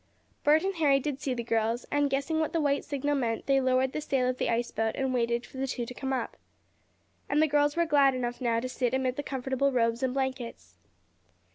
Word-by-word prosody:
Bert 305 +3 +4
and 390 +1 0
Harry 285 -4 +4
did 280 0 -4
see 260 -2 -1
the 235 - -3
girls, 230 +1 0
and, 290 0 +2
guessing 280 +4 0
what 315 +1 -1
the 335 - +1
white 285 -2 +1
signal 290 0 -2
meant, 235 -5 -1
they 270 -1 +3
lowered 260 0 +2
the 305 - -2
sail 265 -3 0
of 255 0 -2
the - - 0
ice 235 +1 0
boat 220 0 -1
and 265 -1 -1
waited 235 -1 0
for - - -13
the 270 +1 -1
two 245 -2 -3
to 250 - -8
come 265 +1 -4
up. 255 -3 -3 0.9
And 290 - +2
the 310 - +6
girls 290 -1 +2
were 340 0 +2
glad 280 -4 +4
enough 245 -1 -3
now 230 -2 +1
to 255 - -3
sit 255 -1 -1
amid 260 -1 0
the 290 - -2
comfortable 270 0 -1
robes 230 -1 +1
and 260 0 -1
blankets. 240 - -4
265 Hz, 235 wpm, -28 LUFS, 240-285 Hz, 0.9 s, the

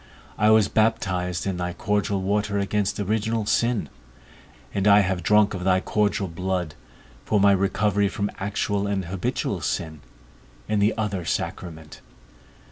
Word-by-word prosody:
I 105 - +3
was 110 -2 +5
baptized 95 -6 0
in 95 -2 -2
thy 90 0 -3
cordial 100 -1 -1
water 100 +1 0
against 100 +1 -1
original 110 +2 -1
sin, 115 -4 +1 0.9
and 100 0 0
I 100 0 +7
have 95 -2 -1
drunk 105 +3 +3
of 90 -2 -5
thy 95 0 +3
cordial 105 0 0
blood, 90 -1 -3 0.5
for 105 - +1
my 100 0 +5
recovery 100 +1 +1
from 100 +1 -3
actual 100 0 -1
and 100 -2 -1
habitual 90 +1 -2
sin, 80 -2 -3 0.7
in 105 - 0
the 105 +2 +2
other 100 -5 -2
sacrament. 80 -2 -5
100 Hz, 140 wpm, -24 LUFS, 95-105 Hz, 0.9 s, I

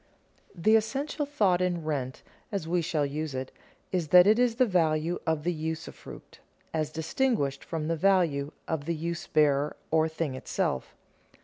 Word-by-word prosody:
_The 215 +6 +5
essential 280 +6 -1
thought 200 -11 +2
in 175 -2 0
rent, 135 -4 -3 0.3
as 195 -6 -3
we 175 +1 +1
shall 155 -3 0
use 150 0 -4
it, 130 0 -4 0.4
is 180 -4 0
that 180 +3 +8
it 215 +3 +5
is 245 -2 +3
the 255 +1 +4
value 165 -4 +1
of 160 -2 0
the 175 +2 0
usufruct 160 0 -7 0.3
as 155 -2 0
distinguished 160 - -1
from 160 -2 -4
the 165 - 0
value 160 -5 +2 0.2
of 160 -3 -2
the 170 - -1
use 170 +2 -4
bearer 145 -1 +2 0.2
or 160 0 +3
thing 160 -3 -3
itself. 130 - -2
160 Hz, 165 wpm, -28 LUFS, 155-185 Hz, 0.4 s, that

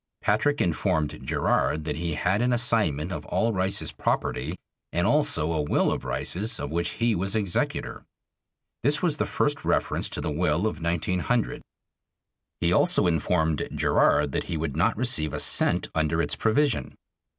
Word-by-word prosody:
Patrick 145 +8 +2
informed 80 -3 0
Gerard 75 +1 0
that 75 -1 -3
he 85 -2 -2
had 95 +7 +1
an 125 +1 +2
assignment 105 - +1
of 90 - -4
all 115 0 +1
Rice's 95 0 -1
property - - -2 0.4
and 85 +1 0
also 145 - +2
a 80 - 0
will 75 - +1
of - - -3
Rice's 110 +5 -3
of 70 - -4
which 85 +1 -1
he 115 0 +1
was 95 +2 -1
executor. 100 -5 -2 0.8
This 145 +6 +2
was 160 -4 +1
the - - -1
first 145 -1 -1
reference - - 0
to - - -4
the - - -2
will 80 +3 +1
of 85 -7 -2
1900. 90 +7 -1 1.0
He - - +2
also - - +3
informed 80 -2 0
Gerard 75 -1 +3
that - - -2
he 85 - -3
would 80 -3 -3
not 85 +6 +1
receive 105 - 0
a - - -3
cent - - +2
under 80 +1 0
its 85 - 0
provision. 125 +4 +1
90 Hz, 160 wpm, -26 LUFS, 80-115 Hz, 1.0 s, also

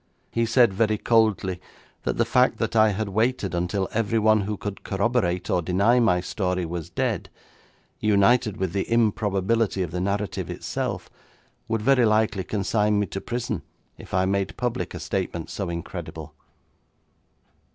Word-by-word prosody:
He 115 0 0
said 120 -2 +4
very 110 +2 +1
coldly 105 -6 +2 0.4
that - - -1
the - - +3
fact - - +3
that - - -2
I 110 -1 +6
had 105 +1 -2
waited 110 -1 0
until 90 +2 -1
everyone 110 -1 +3
who 105 +1 -3
could 100 0 -6
corroborate 95 -3 0
or 90 - +2
deny 100 +8 +3
my 90 -7 +3
story 90 -2 -2
was 85 0 -5
dead, 85 - -2 0.7
united 105 +1 +3
with 95 -2 -2
the 100 +2 -2
improbability 105 -2 +1
of 85 - -5
the 90 - -2
narrative 100 0 -2
itself, - - -4 0.6
would 115 -1 -1
very 130 -1 +4
likely 110 -2 +2
consign 105 +2 +1
me 105 - +1
to 95 - -6
prison 120 -6 -3 0.4
if - - -12
I 95 +1 +2
made 95 0 -1
public 125 0 -2
a - - -5
statement 90 -5 -3
so 100 -4 -3
incredible.' 85 -1 -6
105 Hz, 150 wpm, -25 LUFS, 95-115 Hz, 0.7 s, I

